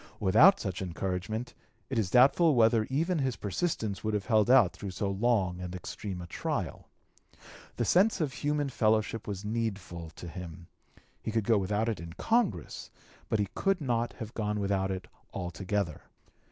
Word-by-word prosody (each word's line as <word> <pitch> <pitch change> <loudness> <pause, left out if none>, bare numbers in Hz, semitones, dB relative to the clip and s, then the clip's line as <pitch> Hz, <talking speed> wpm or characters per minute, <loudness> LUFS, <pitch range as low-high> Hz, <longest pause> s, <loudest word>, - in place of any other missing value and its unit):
Without 110 - +6
such 95 -4 -4
encouragement 95 +6 -3 0.3
it 130 -4 -1
is 100 -5 0
doubtful 140 - +5
whether 115 -1 +4
even 160 +6 0
his 130 -3 0
persistence 105 - -2
would 110 -1 0
have 105 - -2
held 110 -2 +3
out 125 -8 +6
through 100 - -6
so 100 +2 -2
long 100 -4 +1
and 90 0 -5
extreme 90 0 -6
a - - -7
trial. 85 - -4 0.9
The - - 0
sense 195 +4 +4
of 150 -5 -1
human 145 -1 -1
fellowship 110 -2 +1
was 100 -1 -5
needful 100 -7 -3
to 85 - -8
him; 85 0 -8 0.6
he - - -4
could 110 0 0
go 110 -2 +4
without 105 +3 0
it 115 - -1
in 85 0 -8
Congress, 225 - -1 0.4
but 110 - +2
he 100 -2 -1
could 195 -1 +1
not 120 -5 -1
have 110 0 -8
gone 105 -1 -2
without 100 -1 0
it 95 -1 -4 0.3
altogether. 90 -1 -2
105 Hz, 165 wpm, -30 LUFS, 95-125 Hz, 0.9 s, Without